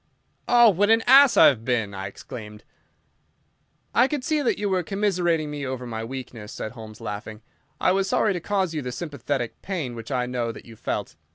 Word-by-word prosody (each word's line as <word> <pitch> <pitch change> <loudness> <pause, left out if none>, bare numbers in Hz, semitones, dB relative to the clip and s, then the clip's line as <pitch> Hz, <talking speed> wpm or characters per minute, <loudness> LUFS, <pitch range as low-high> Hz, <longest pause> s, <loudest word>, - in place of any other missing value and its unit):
"Oh, 240 -2 +7
what 205 +3 +2
an 225 0 +4
ass 270 +1 +7
I - - +9
have 115 -5 +4
been!" 115 -5 -1
I 95 0 -5
exclaimed. 105 +1 -10 1.3
"I 245 - +5
could 290 -2 -3
see 310 0 +1
that 255 - +1
you 205 - -1
were 190 -2 +1
commiserating 175 -5 0
me 145 -1 -5
over 130 -2 -4
my 115 -2 -5
weakness," 120 -3 -7
said 110 - -5
Holmes, 110 -2 -11
laughing. 105 0 -6 0.4
"I - - +3
was 195 0 +1
sorry 210 +1 +2
to 180 - -3
cause 190 -1 -1
you 155 - -2
the 125 -2 -5
sympathetic 135 -3 -4
pain 170 -11 -3
which 115 +2 -8
I 125 -2 0
know 125 -2 -2
that - - -12
you 115 - -12
felt. 105 -5 -4
135 Hz, 200 wpm, -24 LUFS, -, 1.3 s, I